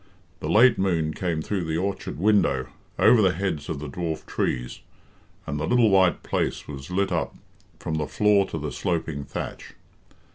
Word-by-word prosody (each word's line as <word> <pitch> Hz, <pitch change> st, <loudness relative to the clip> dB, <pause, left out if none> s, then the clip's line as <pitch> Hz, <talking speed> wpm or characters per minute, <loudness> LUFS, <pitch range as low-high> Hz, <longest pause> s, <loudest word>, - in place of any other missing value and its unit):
The -, -, -4 dB
late 115 Hz, +2 st, +5 dB
moon 85 Hz, -5 st, +1 dB
came 85 Hz, -3 st, -2 dB
through 95 Hz, -2 st, -2 dB
the 80 Hz, 0 st, -1 dB
orchard 100 Hz, +2 st, -3 dB
window, 80 Hz, -9 st, +2 dB, 0.3 s
over 120 Hz, -, +6 dB
the 95 Hz, -3 st, +3 dB
heads 90 Hz, -5 st, -3 dB
of 80 Hz, -, -2 dB
the 75 Hz, +1 st, -6 dB
dwarf 80 Hz, +2 st, -4 dB
trees, -, -, -2 dB, 0.7 s
and 75 Hz, +1 st, -3 dB
the 75 Hz, -, -2 dB
little 120 Hz, -3 st, +4 dB
white 95 Hz, -2 st, +3 dB
place -, -, -2 dB
was 70 Hz, 0 st, -8 dB
lit 95 Hz, +2 st, 0 dB
up -, -, -1 dB, 0.4 s
from 80 Hz, -, -4 dB
the 75 Hz, -, -2 dB
floor 105 Hz, -2 st, +3 dB
to -, -, -4 dB
the 75 Hz, -1 st, -4 dB
sloping 80 Hz, -6 st, -2 dB
thatch. -, -, -7 dB
85 Hz, 175 wpm, -25 LUFS, 75-100 Hz, 0.7 s, over